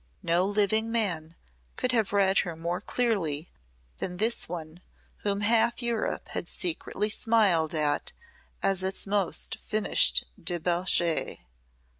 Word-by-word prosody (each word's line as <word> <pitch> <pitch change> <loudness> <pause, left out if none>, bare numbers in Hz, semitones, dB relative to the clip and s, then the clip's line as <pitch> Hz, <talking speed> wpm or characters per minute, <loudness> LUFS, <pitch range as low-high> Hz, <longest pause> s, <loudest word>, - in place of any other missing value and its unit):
No 175 +3 +2
living 215 +2 +1
man 170 -8 0 0.4
could 250 - 0
have 225 -5 +1
read 195 -1 +3
her 170 -2 -2
more 170 +2 -3
clearly 180 -12 -1 0.5
than 180 -1 -3
this 225 0 0
one 165 0 -7 0.4
whom 200 0 -2
half 230 +2 +3
Europe 235 -2 -2
had - - -4
secretly 185 +4 -2
smiled 200 -8 +2
at 150 -2 +1 0.5
as 195 -1 +1
its 190 0 -1
most 200 -2 0
finished 215 0 +2 0.2
debauchée. 175 -1 0
190 Hz, 120 wpm, -27 LUFS, 170-215 Hz, 0.5 s, read